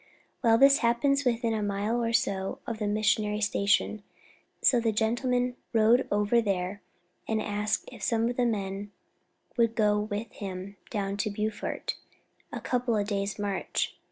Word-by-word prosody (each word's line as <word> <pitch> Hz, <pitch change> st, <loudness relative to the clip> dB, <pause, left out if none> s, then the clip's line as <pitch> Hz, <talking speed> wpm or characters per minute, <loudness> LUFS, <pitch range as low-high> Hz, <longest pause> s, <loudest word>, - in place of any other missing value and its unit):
Well, 225 Hz, -1 st, +5 dB
this 275 Hz, +2 st, +6 dB
happened 270 Hz, +4 st, +2 dB
within 230 Hz, -1 st, +1 dB
a 220 Hz, -, -1 dB
mile 205 Hz, +4 st, -1 dB
or 230 Hz, -, 0 dB
so 195 Hz, -4 st, 0 dB
of 230 Hz, -3 st, -4 dB
the 210 Hz, -, -1 dB
missionary 210 Hz, 0 st, +1 dB
station, 205 Hz, 0 st, +1 dB, 0.6 s
so 245 Hz, -, +4 dB
the 230 Hz, -1 st, +1 dB
gentleman 245 Hz, +3 st, 0 dB, 0.2 s
rode 230 Hz, +3 st, +4 dB
over 210 Hz, +3 st, +3 dB
there 195 Hz, -1 st, -2 dB, 0.5 s
and 220 Hz, -1 st, 0 dB
asked 210 Hz, 0 st, -1 dB
if 240 Hz, -5 st, -12 dB
some 230 Hz, +2 st, +1 dB
of 245 Hz, -, -2 dB
the 245 Hz, -, +2 dB
men 200 Hz, -2 st, -3 dB, 0.7 s
would 230 Hz, -1 st, +2 dB
go 210 Hz, -1 st, +3 dB
with 210 Hz, +1 st, -4 dB
him 195 Hz, 0 st, -7 dB
down 200 Hz, -2 st, -2 dB
to 210 Hz, -, 0 dB
Beaufort, 210 Hz, +1 st, -3 dB, 0.5 s
a -, -, -4 dB
couple 245 Hz, -3 st, 0 dB
of 205 Hz, 0 st, -1 dB
days' 200 Hz, -1 st, -2 dB
march. 200 Hz, -2 st, -2 dB
215 Hz, 155 wpm, -28 LUFS, 205-235 Hz, 0.7 s, this